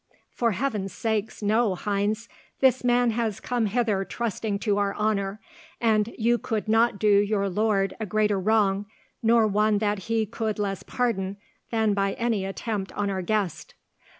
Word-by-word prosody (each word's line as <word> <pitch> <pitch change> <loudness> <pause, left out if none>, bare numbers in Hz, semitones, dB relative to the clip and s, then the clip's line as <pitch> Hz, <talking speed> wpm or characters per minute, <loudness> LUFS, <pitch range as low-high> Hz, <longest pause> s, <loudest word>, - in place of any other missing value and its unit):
"For 235 -3 0
heaven's 210 -4 -2
sake, 220 -1 -1
no, 215 -1 +2
Heinz. 205 +4 -1 0.3
This 260 -1 +3
man 245 -1 +3
has 225 -3 -1
come 240 -3 -1
hither 210 -3 +1
trusting 220 -1 -3
to 205 -1 0
our 200 -1 0
honour, 210 -1 -1 0.4
and 220 -1 +2
you 235 +1 +2
could 220 -1 -3
not 225 0 +3
do 215 - 0
your 205 -1 +1
lord 195 0 +1
a 220 - -3
greater 210 0 +1
wrong, 205 0 +2 0.3
nor 230 0 +4
one 210 0 +2
that 205 -2 -1
he 225 -1 +2
could 220 0 -3
less 195 -2 -2
pardon, 200 -6 -2 0.3
than 220 -2 +1
by 195 -1 0
any 230 -5 -1
attempt 195 0 -4
on 205 -1 -1
our 190 -1 -2
guest." 180 -5 -2
215 Hz, 160 wpm, -26 LUFS, 200-225 Hz, 0.4 s, nor